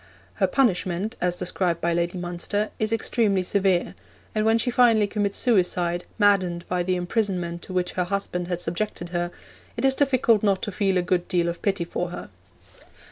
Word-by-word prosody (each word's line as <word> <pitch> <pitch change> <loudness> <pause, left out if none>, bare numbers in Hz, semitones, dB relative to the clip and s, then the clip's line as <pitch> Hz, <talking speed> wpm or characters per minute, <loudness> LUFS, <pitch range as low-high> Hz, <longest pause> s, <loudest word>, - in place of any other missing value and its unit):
Her - - +5
punishment, 205 -3 0
as 180 0 +1
described 180 -1 -1
by 170 +1 0
Lady 170 +2 -1
Munster, 180 +4 -2
is 215 0 0
extremely 215 -4 +1
severe; 190 -1 +1 0.4
and 215 0 0
when 225 +1 +4
she 245 +2 0
finally 230 -3 +4
commits 205 -1 -1
suicide, 180 -6 +1
maddened 190 -5 +2
by 180 0 0
the 185 +1 0
imprisonment 180 -2 -2
to 185 - -9
which 180 -1 0
her 180 - -1
husband 180 -2 -3
had 175 -1 -3
subjected 175 0 -3
her, 175 0 -1 0.5
it - - 0
is 270 - +4
difficult 255 -6 +3
not 200 -3 +1
to 205 - -2
feel 195 -1 +1
a 180 - +1
good 175 -1 0
deal 175 -1 +1
of 170 0 -4
pity 195 -3 0
for 175 +1 -3
her. 175 - -8
185 Hz, 185 wpm, -24 LUFS, 175-210 Hz, 0.5 s, Her